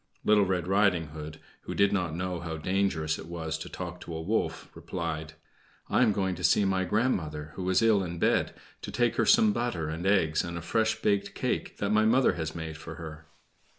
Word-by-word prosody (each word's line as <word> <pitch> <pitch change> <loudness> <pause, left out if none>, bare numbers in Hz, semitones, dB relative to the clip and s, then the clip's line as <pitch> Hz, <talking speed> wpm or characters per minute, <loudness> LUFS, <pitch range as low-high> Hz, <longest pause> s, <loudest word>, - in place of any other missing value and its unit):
Little 105 -2 +5
Red 90 -2 -1
Riding 95 -5 +2
Hood, 75 +1 -8 0.3
who - - -4
did 100 0 +3
not 90 -5 -1
know 90 0 -3
how 80 -1 -5
dangerous 85 -3 0
it - - -9
was 80 -2 -4
to - - -7
talk 90 -1 -6
to 85 - -7
a 80 - -4
wolf, 110 +6 -1
replied: 80 -3 -5 0.6
"I - - +3
am 120 -4 +5
going 95 -2 0
to 90 +1 -8
see 100 - +4
my 95 -1 +1
grandmother, 80 -8 -1
who 95 -1 -3
is 95 +4 +3
ill 110 -4 +4
in 85 -1 -5
bed, - - +1 0.3
to - - -6
take - - +1
her - - +2
some 105 -1 +6
butter 110 -10 -2
and 80 +4 -3
eggs 80 -6 +3
and 85 0 -5
a - - -5
fresh 110 +5 0
baked 100 -1 +1
cake - - -2
that 100 0 -1
my 110 0 +4
mother 125 +4 +4
has 80 -2 -4
made 80 -2 -5
for 80 +1 -8
her!" 80 -2 -9
90 Hz, 215 wpm, -28 LUFS, 80-100 Hz, 0.6 s, some